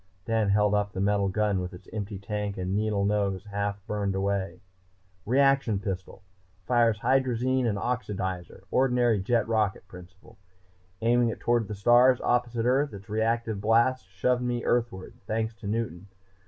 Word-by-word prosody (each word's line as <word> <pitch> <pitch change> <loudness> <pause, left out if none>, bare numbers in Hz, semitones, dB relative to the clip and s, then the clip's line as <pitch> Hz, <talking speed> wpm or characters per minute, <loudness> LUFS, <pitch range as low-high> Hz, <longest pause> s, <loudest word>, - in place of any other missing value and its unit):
Dan 110 -2 +1
held 105 +1 +3
up 105 0 0
the - - -4
metal 100 0 +1
gun 100 -1 0
with 90 0 -6
its 90 - -15
empty 105 -1 -4
tank 105 0 -4
and 95 +1 -2
needle 105 -1 0
nose 100 -2 0
half 100 0 -2
burned 100 -2 -2
away. 95 -1 -2 0.7
"Reaction 135 -3 +3
pistol. 95 -1 -6 0.4
Fires 120 -3 +3
hydrazine 130 -1 +1
and 105 -3 0
oxidizer, 95 -7 -3
ordinary 125 -4 +2
jet 115 +2 +1
rocket 105 -4 0
principle. 95 +4 -15 0.6
Aiming 120 +1 +3
it - - -5
toward 120 -3 +1
the 105 - -5
stars, 120 +5 +5
opposite 120 -1 0
earth, 135 0 +1
its 100 +2 -12
reactive 110 -1 -1
blasts 115 +1 +2
shoved 120 +7 0
me 120 -1 -2
Earthward, 115 -6 -1
thanks 110 +1 -1
to 105 - -8
Newton. 100 -4 -3
105 Hz, 155 wpm, -27 LUFS, 100-120 Hz, 0.7 s, stars